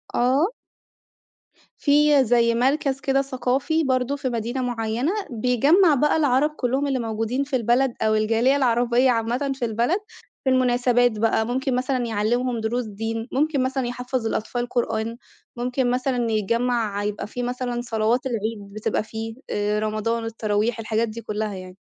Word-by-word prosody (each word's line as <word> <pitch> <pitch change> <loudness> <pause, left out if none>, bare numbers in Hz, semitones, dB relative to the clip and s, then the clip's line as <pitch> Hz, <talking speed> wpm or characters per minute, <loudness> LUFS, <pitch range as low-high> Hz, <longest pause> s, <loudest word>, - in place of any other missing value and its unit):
آه. 265 +8 +3 1.3
في 290 -1 +4
زي 235 0 +3
مركز 270 +2 +1
كده 270 0 +1
ثقافي 270 +4 0
برضو 260 0 0
في 275 -2 -3
مدينة 240 +2 -2
مُعيَّنة، 240 +4 -1 0.2
بيجمّع 280 - +3
بقى 295 +4 +2
العرب 290 -1 +3
كُلُّهم 275 -1 -1
اللي 265 -2 0
موجودين 225 +3 -1
في 280 -1 -3
البلد، 245 +2 +2
أو 215 0 +2
الجالية 225 +5 +2
العربية 245 -1 +3
عامَّةً 240 +4 -1
في 255 -2 -2
البلد 235 - +1 0.5
في 265 - +1
المناسبات 245 -2 +2
بقى، 220 0 +2
ممكن 260 +1 -1
مثلًا 255 0 0
يعلِّمهم 235 +2 0
دروس 235 +2 -1
دين، 225 +2 -4
ممكن 285 -1 +1
مثلًا 260 -1 -1
يحفّظ 250 0 -3
الأطفال 240 +2 -2
قرآن، 230 -1 -1 0.4
ممكن 245 +1 0
مثلًا 250 -2 0
يجمّع 220 -1 0
يبقى 205 0 -3
في 245 +3 -5
مثلًا 245 0 -2
صلوات 235 +1 0
العيد 220 -4 -4
بتبقى 215 0 -1
فيه، 220 +1 -6
آآ 210 0 0
رمضان 215 +2 -1
والتَّراويح 220 0 -1
الحاجات 225 +1 0
دي 225 +1 -7
كُلَّها 210 -1 -3
يعني. 185 0 -10
245 Hz, 150 wpm, -23 LUFS, 225-260 Hz, 1.3 s, في